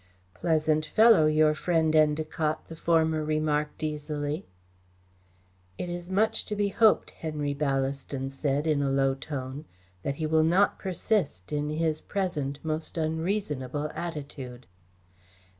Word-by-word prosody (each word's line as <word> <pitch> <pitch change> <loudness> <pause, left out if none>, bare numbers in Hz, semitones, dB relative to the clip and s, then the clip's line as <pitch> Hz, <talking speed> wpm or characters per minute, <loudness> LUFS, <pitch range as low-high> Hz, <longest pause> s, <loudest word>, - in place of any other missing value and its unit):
"Pleasant 155 - +1
fellow, 220 -7 +6
your 155 0 +4
friend 160 0 +1
Endacott!" 155 0 +2
the 165 - -7
former 160 -1 +2
remarked 150 0 -1
easily. 150 +1 -3 1.3
"It 175 - -4
is 175 0 -5
much 210 +4 +2
to 210 - -2
be 205 -1 +1
hoped," 220 +1 +3
Henry 150 -3 -3
Ballaston 135 -1 -2
said, 140 +2 -1
in 150 -3 +2
a 140 - +1
low 135 0 +2
tone, 135 +1 -6 0.4
"that 140 +7 -2
he 155 - -3
will 160 0 +3
not 180 +5 +3
persist 180 - -1
in 150 0 -1
his 155 0 0
present 155 -9 -2
most 160 +1 -3
unreasonable 155 -4 -1
attitude." 140 -7 -6
155 Hz, 125 wpm, -28 LUFS, 145-165 Hz, 1.3 s, fellow